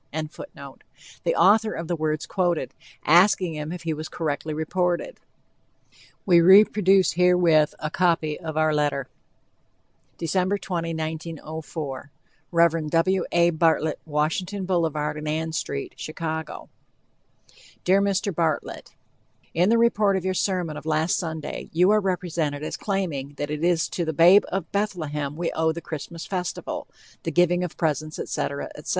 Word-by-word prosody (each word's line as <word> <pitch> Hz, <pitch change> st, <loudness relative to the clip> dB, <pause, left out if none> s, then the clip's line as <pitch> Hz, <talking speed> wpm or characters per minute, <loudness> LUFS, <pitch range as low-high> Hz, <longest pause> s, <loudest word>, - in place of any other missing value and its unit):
] -, -, -43 dB
the 155 Hz, -, -7 dB
author 215 Hz, +1 st, +4 dB
of 165 Hz, -, -5 dB
the 175 Hz, -, -1 dB
words 155 Hz, -1 st, -2 dB
quoted, 175 Hz, -7 st, -1 dB, 0.3 s
asking 180 Hz, +1 st, +4 dB
him 150 Hz, 0 st, -5 dB
if 175 Hz, -1 st, -7 dB
he 165 Hz, -1 st, -1 dB
was 155 Hz, +1 st, -6 dB
correctly 155 Hz, -1 st, -3 dB
reported. 175 Hz, -, -1 dB, 1.1 s
We 175 Hz, -3 st, +6 dB
reproduce 195 Hz, 0 st, +6 dB
herewith 175 Hz, -4 st, +3 dB
a 155 Hz, -, -4 dB
copy 165 Hz, -4 st, +1 dB
of 160 Hz, -3 st, -6 dB
our 155 Hz, 0 st, +3 dB
letter: 145 Hz, -3 st, 0 dB, 1.1 s
DEC, 185 Hz, +4 st, 0 dB
20, 170 Hz, -3 st, -3 dB
1904. 155 Hz, -3 st, -6 dB, 0.4 s
Rev. 165 Hz, -2 st, +3 dB
W. 175 Hz, +3 st, +2 dB
A. 170 Hz, 0 st, +4 dB
Bartlett, 160 Hz, -1 st, +1 dB
Washington 165 Hz, +6 st, -2 dB
Boul. 175 Hz, -3 st, +1 dB
and 150 Hz, 0 st, -3 dB
Ann 160 Hz, +1 st, -1 dB
St., 140 Hz, -3 st, -4 dB
Chicago 160 Hz, 0 st, -5 dB, 1.2 s
DEAR 195 Hz, +2 st, +4 dB
MR. 200 Hz, 0 st, 0 dB
BARTLETT: 160 Hz, -2 st, -2 dB, 0.6 s
In 175 Hz, +4 st, +3 dB
the 230 Hz, -, +4 dB
report 215 Hz, -4 st, +3 dB
of 185 Hz, -, -5 dB
your 190 Hz, -, +1 dB
sermon 180 Hz, -5 st, -1 dB
of 150 Hz, +1 st, -9 dB
last 160 Hz, +2 st, +1 dB
Sunday 160 Hz, -3 st, -5 dB
you 180 Hz, +4 st, +4 dB
are 215 Hz, 0 st, +4 dB
represented 170 Hz, -6 st, -2 dB
as -, -, -4 dB
claiming 160 Hz, -9 st, -3 dB
that 145 Hz, +1 st, -4 dB
it 150 Hz, +1 st, -3 dB
is 170 Hz, -2 st, +2 dB
to 175 Hz, -, -2 dB
the 160 Hz, -1 st, -2 dB
"babe 175 Hz, +7 st, +6 dB
in 190 Hz, -3 st, -2 dB
Bethlehem" 155 Hz, -8 st, -2 dB
we 170 Hz, +1 st, -2 dB
owe 160 Hz, 0 st, +1 dB
the 165 Hz, -, -5 dB
Christmas 165 Hz, +1 st, -7 dB
festival, 180 Hz, -3 st, -4 dB, 0.3 s
the -, -, -3 dB
giving 175 Hz, +2 st, +2 dB
of 180 Hz, -, -5 dB
presents, 155 Hz, -1 st, -1 dB
etc., 140 Hz, 0 st, -3 dB
etc. 150 Hz, -, -9 dB
165 Hz, 145 wpm, -24 LUFS, 155-180 Hz, 1.2 s, We